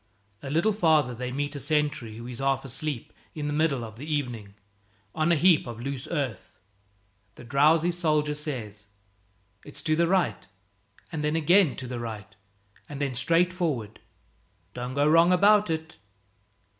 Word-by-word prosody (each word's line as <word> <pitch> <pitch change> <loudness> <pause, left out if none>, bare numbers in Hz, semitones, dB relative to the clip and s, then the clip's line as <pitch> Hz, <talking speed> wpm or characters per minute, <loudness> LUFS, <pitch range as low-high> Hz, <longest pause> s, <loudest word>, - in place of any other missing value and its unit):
A 135 - -7
little 170 +9 +2
farther 155 - +3
they 125 +1 -5
meet 145 +2 -3
a - - -3
sentry 145 -6 -1
who 115 - -8
is 125 -1 -7
half 135 0 0
asleep 140 -1 -4 0.2
in 150 -2 -4
the 145 - -2
middle 150 -5 +1
of 110 -1 -9
the 150 +5 -7
evening 120 -9 -3 0.6
on 155 +2 +1
a - - +5
heap 165 -2 +4
of 115 -1 -7
loose 135 +3 -5
earth. 140 -8 -3 0.9
The - - -12
drowsy 155 +7 +3
soldier 155 -4 0
says, 115 -9 -6 0.8
"It's 145 - -9
to 155 -1 +1
the 170 +1 +2
right, 170 - 0 0.6
and 155 -3 -4
then 150 +1 0
again 170 0 +4
to 130 - -7
the 125 -1 -5
right, 110 -3 -7 0.5
and 145 -2 -7
then 140 -2 -1
straight 170 +8 +2
forward. 140 - -3 0.7
Don't 125 +1 -5
go 145 +1 +3
wrong 165 +3 +5
about 205 +2 +5
it." 160 0 -4
145 Hz, 165 wpm, -26 LUFS, 125-160 Hz, 0.9 s, a